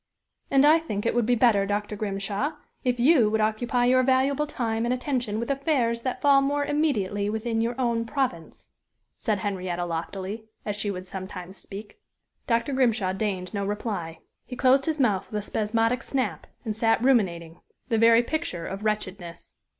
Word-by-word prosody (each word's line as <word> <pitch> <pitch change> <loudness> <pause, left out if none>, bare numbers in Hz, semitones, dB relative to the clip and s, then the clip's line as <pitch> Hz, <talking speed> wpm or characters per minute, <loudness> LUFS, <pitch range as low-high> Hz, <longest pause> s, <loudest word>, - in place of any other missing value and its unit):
"And 275 +1 +5
I 310 +2 +6
think 210 -11 -4
it - - +2
would 235 -2 +1
be 245 - +4
better, 220 -5 +3
Dr. 205 +1 -2
Grimshaw, 200 +7 -2 0.3
if 250 -2 0
you 250 -4 +5
would 220 +1 0
occupy 235 +3 +1
your 255 +1 +5
valuable 270 +3 +2
time 225 -5 -2
and 240 - 0
attention 250 -4 -1
with 235 +3 -2
affairs 265 -5 0
that 255 0 -4
fall 280 -1 +6
more 285 +1 0
immediately 210 -10 0
within 225 +1 -1
your 235 +3 -2
own 235 -2 0
province," 230 - -3 0.5
said 215 -4 0
Henrietta, 185 -3 -3
loftily, 190 +6 -5 0.2
as 210 - -2
she 205 0 -1
would 185 -2 -5
sometimes 190 0 -7
speak. 205 - -10 0.5
Dr. 235 +4 +1
Grimshaw 230 -7 +2
deigned 190 -2 -3
no 200 -1 -1
reply. 195 -5 -4 0.2
He 250 - -8
closed 265 +3 +3
his 315 -2 0
mouth 210 -8 +1
with 210 - -2
a 210 - -4
spasmodic 225 +3 0
snap, 265 -2 -2 0.2
and 215 -2 -2
sat 225 +1 +2
ruminating 175 -10 +1 0.3
the 225 -2 +2
very 230 +1 +6
picture 295 - -3
of 195 +2 -6
wretchedness. 195 -5 -4
225 Hz, 175 wpm, -26 LUFS, 200-255 Hz, 0.5 s, I